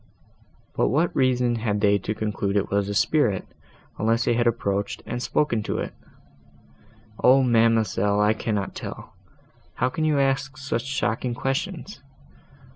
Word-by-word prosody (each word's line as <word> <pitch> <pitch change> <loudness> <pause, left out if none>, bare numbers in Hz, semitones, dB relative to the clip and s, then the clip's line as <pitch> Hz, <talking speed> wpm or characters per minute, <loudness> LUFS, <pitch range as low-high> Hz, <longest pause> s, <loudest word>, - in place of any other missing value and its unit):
"But - - +1
what 160 +5 +1
reason 125 -2 +2
had 105 -2 -1
they 100 0 +3
to 105 +3 -4
conclude 105 -2 -1
it 100 - -1
was 100 0 +1
a 100 - -3
spirit, 115 -6 +2 0.5
unless 115 +2 +1
they - - +2
had 120 0 +1
approached, 100 -3 -1
and 120 +1 -4
spoken 120 -4 0
to - - -3
it?" - - -4 1.3
"O 130 +2 +6
ma'amselle, 115 -4 +2
I 105 +1 +4
cannot 105 -3 -2
tell. - - -8 0.6
How 125 - +1
can 155 +4 -3
you 155 -2 +2
ask 135 -1 0
such 130 -4 -3
shocking 120 -2 -1
questions? 145 +7 -3
115 Hz, 145 wpm, -24 LUFS, 105-135 Hz, 1.3 s, O